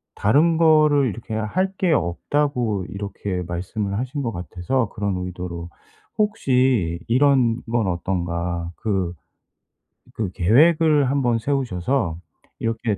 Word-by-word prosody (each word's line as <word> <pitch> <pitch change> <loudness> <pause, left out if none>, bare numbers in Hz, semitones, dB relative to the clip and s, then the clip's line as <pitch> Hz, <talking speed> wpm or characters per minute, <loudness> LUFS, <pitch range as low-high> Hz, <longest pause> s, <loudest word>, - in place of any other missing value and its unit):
다른 150 +10 +3
거를 155 -4 +4
이렇게 110 +1 -6
할 110 - -1
게 180 -3 +1
없다고 110 - 0
이렇게 100 -1 -4
말씀을 95 +4 -3
하신 130 +3 -3
것 115 - -1
같아서 95 +6 -2
그런 100 -2 -2
의도로 90 -2 -6 0.5
혹시 130 - +1
이런 125 -2 +3
건 115 -4 +1
어떤가. 85 -1 -2
그 95 -5 -1 1.0
그 105 -5 -2
계획을 150 - +4
1 140 0 +1
번 120 -2 +2
세우셔서 120 - -1 0.4
이렇게 115 -2 -1
110 Hz, 230 characters per minute, -22 LUFS, 90-140 Hz, 1.0 s, 거를